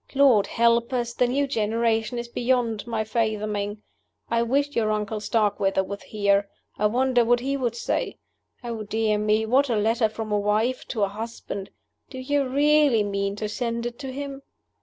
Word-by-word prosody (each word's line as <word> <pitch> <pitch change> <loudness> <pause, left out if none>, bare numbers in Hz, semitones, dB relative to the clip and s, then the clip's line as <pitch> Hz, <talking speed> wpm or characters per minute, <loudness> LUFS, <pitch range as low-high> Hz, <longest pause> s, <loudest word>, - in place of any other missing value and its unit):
Lord 265 -7 +5
help 235 +1 +2
us! 240 -1 -1
the 245 - +2
new 280 +3 +1
generation 225 -1 0
is 235 0 -4
beyond 235 -2 0
my 225 -2 -1
fathoming. 215 -2 -2 0.5
I 230 0 +2
wish 280 +5 0
your 220 -2 +1
uncle 215 0 -1
Starkweather 205 -3 +1
was 200 +1 -6
here: 200 -1 +1 0.3
I 210 - +4
wonder 250 +2 +2
what 240 +1 +2
he 275 +2 -1
would 245 -4 -1
say? 235 - -2 0.5
Oh, 230 -2 -4
dear 215 0 0
me, 215 +1 +2
what 265 +5 +3
a 235 - +1
letter 220 +2 +2
from 215 0 -6
a 210 - +2
wife 215 +5 0
to 220 -5 -1
a - - +3
husband! 205 -1 -6 0.4
Do 260 - -9
you 275 +1 0
really 285 -3 +4
mean 200 0 -2
to 215 +1 -3
send 235 +1 -3
it 240 0 -5
to 270 -2 -5
him?" 275 0 -6
230 Hz, 180 wpm, -25 LUFS, 210-250 Hz, 0.5 s, Lord